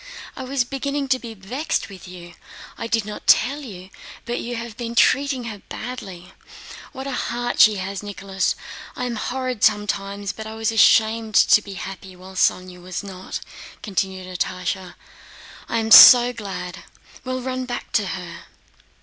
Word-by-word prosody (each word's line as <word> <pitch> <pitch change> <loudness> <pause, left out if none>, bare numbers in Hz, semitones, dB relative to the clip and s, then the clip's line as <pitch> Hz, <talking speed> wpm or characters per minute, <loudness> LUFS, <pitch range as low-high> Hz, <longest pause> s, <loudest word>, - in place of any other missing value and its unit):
I - - -7
was 265 -1 0
beginning 275 +2 -3
to 260 -1 +2
be 230 -2 -9
vexed 250 +11 -3
with 190 -3 -12
you. 175 -1 -11 0.4
I - - -5
did 225 -2 0
not 210 0 -8
tell 275 +6 +4
you, 190 -8 -10 0.3
but 240 +1 -3
you 240 +1 -5
have 230 -1 -6
been 235 -1 -6
treating 270 +1 +3
her 215 -4 -7
badly. 195 -8 -8 0.6
What 265 0 -8
a 275 - -4
heart 240 -2 -3
she 215 -2 +7
has, 195 0 -4
Nicholas! 195 -2 -2 0.4
I 250 - -3
am 240 -1 -3
horrid 255 0 -3
sometimes, 200 -1 0
but 220 +1 -8
I 220 - -7
was 225 0 -1
ashamed 220 -1 +3
to 210 - +6
be 200 -1 -9
happy 190 0 -8
while 185 +1 -13
Sónya 185 -1 0
was 180 +2 -6
not," 190 -2 -7 0.4
continued 190 -2 -2
Natásha. 180 0 -2
"Now 185 -2 -11 0.8
I - - 0
am 220 -1 -2
so 245 +1 +10
glad! 195 -5 -6 0.4
Well, 255 0 -3
run 255 0 -3
back 245 -1 -6
to 205 -3 +1
her." 180 -2 -7
215 Hz, 165 wpm, -22 LUFS, 190-245 Hz, 0.8 s, so